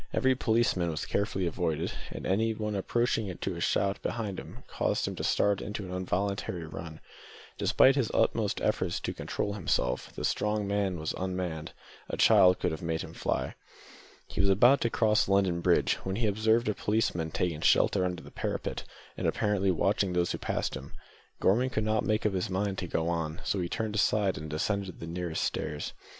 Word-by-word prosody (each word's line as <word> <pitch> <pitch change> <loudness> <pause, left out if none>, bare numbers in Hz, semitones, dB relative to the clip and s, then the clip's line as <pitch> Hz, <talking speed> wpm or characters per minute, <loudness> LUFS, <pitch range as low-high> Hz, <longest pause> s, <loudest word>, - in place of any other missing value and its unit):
Every 130 0 +3
policeman 110 -8 +1
was 80 -2 -3
carefully 100 -2 -1
avoided, 80 -1 -1 0.2
and - - -7
anything 105 +1 0
approaching 110 -2 0
to 95 - -3
a 85 - -6
shout 100 +2 +1
behind 105 -5 -3 0.2
caused - - -1
him - - -3
to - - -3
start 100 -1 +2
into 105 -1 -5
an 90 - -7
involuntary 90 -1 -2
run. 80 0 -8 0.6
Despite 135 0 +5
his 130 -6 +1
utmost - - +1
efforts - - 0
to - - -3
control 100 - -3
himself, 70 -9 -1
the - - -3
strong 105 0 0
man 100 -3 0
was 80 - -2
unmanned; 90 -4 -3 0.4
a - - -3
child 90 0 +6
could - - -1
have 80 - -5
made 80 -1 -2
him - - -9
fly. - - -2 0.7
He 85 - -2
was 100 - +3
about 120 +8 +5
to 115 - +2
cross 110 -2 +2
London 95 -3 +2
Bridge, - - +3
when 95 0 -3
he 115 +2 0
observed 110 +3 +2
a 105 - +2
policeman 100 -7 0
taking 80 -1 -1
shelter 95 - +4
under 90 -2 -2
the - - -12
parapet, - - -3 0.3
and - - -1
apparently 100 -2 +1
watching 95 +2 +1
those 85 0 +1
who - - -3
passed - - -2
him. - - -8 0.5
Gorman 120 +7 +3
could 110 -4 -1
not 110 0 +1
make 110 0 0
up 105 - +2
his 95 -1 -1
mind 95 +1 -1
to 90 - -4
go 80 0 -1
on, 80 -1 -2
so 100 - 0
he 85 -1 -2
turned 110 +1 -2
aside 105 -2 +2
and 75 +1 -6
descended 95 +5 -2
the - - -6
nearest 85 -1 -3
stairs. 75 -1 -3
95 Hz, 190 wpm, -29 LUFS, 85-105 Hz, 0.7 s, child